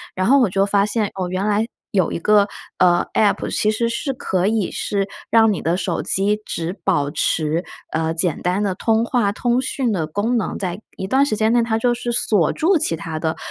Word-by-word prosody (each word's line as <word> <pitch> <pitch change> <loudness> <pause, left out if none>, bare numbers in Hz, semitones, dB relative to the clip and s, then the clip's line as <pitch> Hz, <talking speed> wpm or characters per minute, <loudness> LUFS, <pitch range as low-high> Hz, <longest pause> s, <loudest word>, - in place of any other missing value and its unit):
然 185 0 0
后 275 +3 +6
我 240 -7 +3
就 195 +2 +2
发 200 0 +2
现， 215 +1 0
哦， 185 -2 -3
原 185 +2 -2
来 210 +1 +1 0.3
有 185 -4 +1
一 - - -3
个， 205 +2 +3 0.3
呃 175 -1 +4
，App 210 -2 +2
其 215 - +2
实 230 +2 0
是 250 +4 -2
可 190 -7 -1
以 215 -3 0
是 200 -1 -2 0.2
让 225 -2 +5
你 190 - -4
的 170 +2 0
手 185 - -2
机 205 +2 0
只 165 +1 -3
保 145 -7 +1
持， 155 +2 0 0.3
呃， 160 0 0
简 165 -1 -1
单 180 +3 0
的 195 -3 -1
通 225 +3 +1
话、 235 -4 +1
通 240 +4 0
讯 255 -3 -1
的 165 -5 -1
功 205 +9 -1
能， 230 - -1
在 185 +1 -4 0.2
一 190 - -4
段 265 +6 +3
时 215 -7 -1
间 220 +1 +2
内 240 -1 +4
它 225 -1 0
就 240 +1 +2
是 240 0 -3
锁 205 -7 +2
住 350 +3 +2
其 170 - -1
它 160 -1 -5
的 160 0 -2
205 Hz, 245 characters per minute, -20 LUFS, 180-230 Hz, 0.3 s, 后